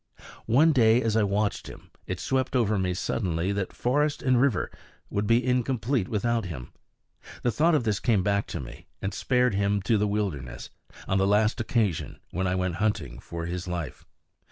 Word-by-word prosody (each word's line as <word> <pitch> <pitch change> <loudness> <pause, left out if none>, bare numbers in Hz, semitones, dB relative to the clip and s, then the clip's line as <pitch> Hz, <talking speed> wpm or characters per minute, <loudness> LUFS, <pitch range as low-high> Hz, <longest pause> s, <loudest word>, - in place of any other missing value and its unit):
One 145 +8 +5
day 115 -4 +5
as 115 -3 0
I 110 - +4
watched 100 +1 0
him, - - -12 0.2
it 95 -1 -3
swept 130 0 -1
over 110 -4 +2
me 90 -1 0
suddenly 90 -2 -1
that 100 -2 -2
forest 145 +4 0
and 130 -2 +3
river 130 -9 +1 0.4
would 100 0 -1
be 115 +2 +3
incomplete 125 -3 0
without 115 +1 0
him. 75 -9 -7 0.7
The 120 - +2
thought 160 +9 +3
of 145 - +2
this 105 -3 0
came 110 -6 +2
back 100 0 +1
to - - -5
me, - - -10
and 100 - -3
spared 125 -3 +2
him 100 +1 +1
to 110 +2 +2
the 105 - +2
wilderness, 100 -11 -3 0.4
on 95 - +1
the 95 - +3
last 105 +4 +2
occasion 110 -7 -1
when 95 +2 -1
I 90 - 0
went 90 -2 -1
hunting 95 - -1
for 85 +4 -6
his 90 +1 -4
life. 85 -7 -4
105 Hz, 185 wpm, -27 LUFS, 95-120 Hz, 0.7 s, One